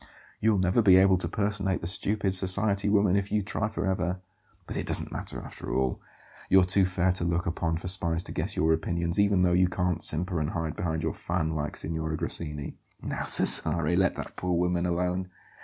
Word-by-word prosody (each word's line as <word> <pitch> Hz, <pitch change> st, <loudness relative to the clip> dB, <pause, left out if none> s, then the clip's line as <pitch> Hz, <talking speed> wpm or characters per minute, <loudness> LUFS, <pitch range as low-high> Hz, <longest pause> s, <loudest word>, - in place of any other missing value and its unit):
"You'll 110 Hz, -1 st, +2 dB
never 95 Hz, +4 st, +2 dB
be 95 Hz, -4 st, +6 dB
able 95 Hz, 0 st, +5 dB
to 85 Hz, -, -3 dB
personate 100 Hz, 0 st, -1 dB
the -, -, -5 dB
stupid 100 Hz, +1 st, 0 dB
society 100 Hz, +2 st, +1 dB
woman 100 Hz, -2 st, +3 dB
if 100 Hz, 0 st, -1 dB
you 105 Hz, -1 st, +1 dB
try 110 Hz, +2 st, -2 dB
for 110 Hz, -, -3 dB
ever. 95 Hz, -1 st, -1 dB, 0.5 s
But -, -, -6 dB
it -, -, -3 dB
doesn't -, -, -1 dB
matter, -, -, -5 dB
after -, -, -8 dB
all; 65 Hz, -1 st, 0 dB, 0.5 s
you're 95 Hz, -1 st, +6 dB
too 95 Hz, +1 st, +3 dB
fair 90 Hz, 0 st, +1 dB
to 90 Hz, -1 st, -2 dB
look 85 Hz, 0 st, 0 dB
upon 80 Hz, -1 st, -1 dB
for 90 Hz, -, -6 dB
spies 85 Hz, -2 st, 0 dB
to -, -, -6 dB
guess -, -, -3 dB
your 80 Hz, 0 st, +2 dB
opinions, 85 Hz, +2 st, -1 dB
even 100 Hz, -2 st, +3 dB
though 90 Hz, -1 st, +3 dB
you 90 Hz, +1 st, +4 dB
can't 90 Hz, -1 st, -1 dB
simper 90 Hz, +2 st, -2 dB
and 75 Hz, -1 st, -1 dB
hide 80 Hz, -2 st, -3 dB
behind 80 Hz, -2 st, -2 dB
your -, -, -1 dB
fan 80 Hz, 0 st, -2 dB
like 75 Hz, -1 st, -3 dB
Signora 80 Hz, 0 st, -3 dB
Grassini." 75 Hz, -3 st, -5 dB, 0.2 s
"Now -, -, -4 dB
Cesare, 85 Hz, 0 st, +3 dB
let 95 Hz, 0 st, +2 dB
that -, -, -7 dB
poor 90 Hz, -1 st, -1 dB
woman 90 Hz, 0 st, 0 dB
alone! 90 Hz, +1 st, -1 dB
90 Hz, 205 wpm, -27 LUFS, 85-95 Hz, 0.5 s, be